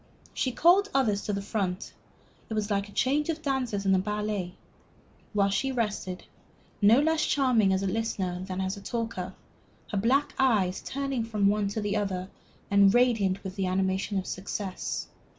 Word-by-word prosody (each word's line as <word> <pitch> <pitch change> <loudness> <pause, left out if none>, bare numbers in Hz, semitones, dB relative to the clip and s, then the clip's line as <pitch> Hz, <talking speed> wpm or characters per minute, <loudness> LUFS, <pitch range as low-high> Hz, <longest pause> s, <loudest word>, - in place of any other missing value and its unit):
She 260 - 0
called 365 +9 +4
others 215 -7 +2
to 205 - -1
the 200 0 -2
front 195 -2 -3 0.6
it 220 - -3
was 215 0 -1
like 200 0 0
a - - -13
change 285 +8 +1
of 320 -1 -2
dancers 250 -8 -1
in 195 - +3
the 190 - +4
ballet 210 -2 -2 0.8
while 200 -2 +2
she 270 +7 0
rested, 210 -6 -3 0.6
no 215 +5 +6
less 320 +1 +2
charming 250 -8 +3
as 190 +1 +1
a - - 0
listener 190 -3 -2
than 190 0 -4
as 190 +1 -2
a 200 - -10
talker, 210 -5 -4 0.6
her 205 - -1
black 265 +7 +2
eyes 210 -8 +2
turning 275 -3 -2
from 215 -3 -1
one 205 0 +1
to 205 +1 -2
another 195 -3 -1 0.4
and 200 0 +6
radiant 220 -6 +2
with 190 -1 -6
the 195 -2 -1
animation 190 +2 0
of 190 - -2
success. 190 0 -4
205 Hz, 170 wpm, -28 LUFS, 190-240 Hz, 0.8 s, no